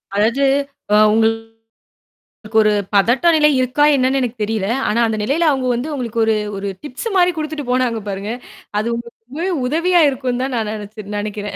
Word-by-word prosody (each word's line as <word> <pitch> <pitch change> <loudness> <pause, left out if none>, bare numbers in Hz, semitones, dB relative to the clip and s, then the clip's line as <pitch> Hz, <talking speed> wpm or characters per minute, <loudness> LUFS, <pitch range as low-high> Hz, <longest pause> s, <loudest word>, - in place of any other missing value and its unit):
அதாவது 230 +7 +2 0.5
அ - - +6 0.2
உங்களுக்கு 225 0 -1 1.0
ஒரு 215 - +3 0.2
பதட்ட 240 - +3
நிலை 300 -1 +5
இருக்கா 255 +3 +1
என்னன்னு 265 +1 +1
எனக்குத் 235 -3 -3
தெரியல. 210 -2 -2 0.2
ஆனா 225 +3 +1
அந்த 220 -1 -2
நிலையில 310 +8 +1
அவங்க 260 -2 -1
வந்து 275 +6 -4
உங்களுக்கு 235 -4 -3
ஒரு 220 -1 +2 0.2
ஒரு 200 +1 -4 0.2
டிப்ஸு 295 - -5
மாரி 360 0 +4
குடுத்துட்டு 305 -4 -4
போனாங்க 245 -3 0
பாருங்க. 200 +3 -4 0.5
அது 220 - -2
உங்களுக்கு 235 -1 -9
ரொம்பவே 325 +8 -3 0.2
உதவியா 340 +4 +2
இருக்கும்ன்னு 255 -1 -2
தான் 265 -2 -3
நா - - +1
நெனைச்சு 210 -1 -8
நெனைக்கிறேன். 205 0 -5
240 Hz, 165 wpm, -18 LUFS, 220-275 Hz, 1.0 s, அ